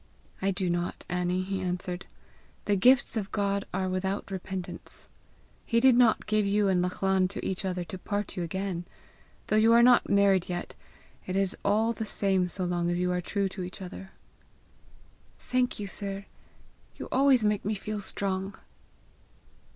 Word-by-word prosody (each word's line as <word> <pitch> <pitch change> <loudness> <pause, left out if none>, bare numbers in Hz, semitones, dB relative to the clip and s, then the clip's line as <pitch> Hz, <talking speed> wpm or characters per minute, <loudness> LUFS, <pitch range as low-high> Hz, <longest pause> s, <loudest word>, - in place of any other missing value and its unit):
"I 195 - +2
do 185 -1 -1
not, 175 0 -2
Annie," 180 +1 0
he 195 0 -3
answered. 180 0 -3 0.6
"'The 205 - +2
gifts 250 +7 +4
of 205 -3 -3
God 200 -1 -1
are 190 0 -1
without 190 +2 -2
repentance.' 190 -1 -6 0.6
He 230 - +2
did 260 0 +6
not 240 -3 +4
give 215 0 +2
you 200 0 +2
and 180 -2 +2
Lachlan 185 +1 +1
to 200 - -6
each 190 0 -2
other 180 -2 -2
to 185 +2 -7
part 205 +1 -3
you 180 - -3
again! 175 0 -3 0.6
Though 215 - +1
you 220 +1 +5
are 235 0 +7
not 245 0 +5
married 200 -3 +3
yet, 175 0 -4 0.5
it 185 - -2
is 195 -1 +1
all 220 +3 +2
the 220 -2 -5
same 190 -3 +1
so 185 +1 -3
long 175 -1 0
as 175 0 0
you 180 0 +1
are 180 0 0
true 200 +2 -1
to 190 - -7
each 180 +1 -6
other." 190 0 -8 1.3
"Thank 250 -2 -1
you, 205 - -3
sir; 195 0 -4 0.7
you - - -7
always 265 -3 +4
make 210 -1 +1
me 210 +2 -1
feel 210 +1 -4
strong!" 195 0 -2
195 Hz, 170 wpm, -28 LUFS, 180-210 Hz, 1.3 s, are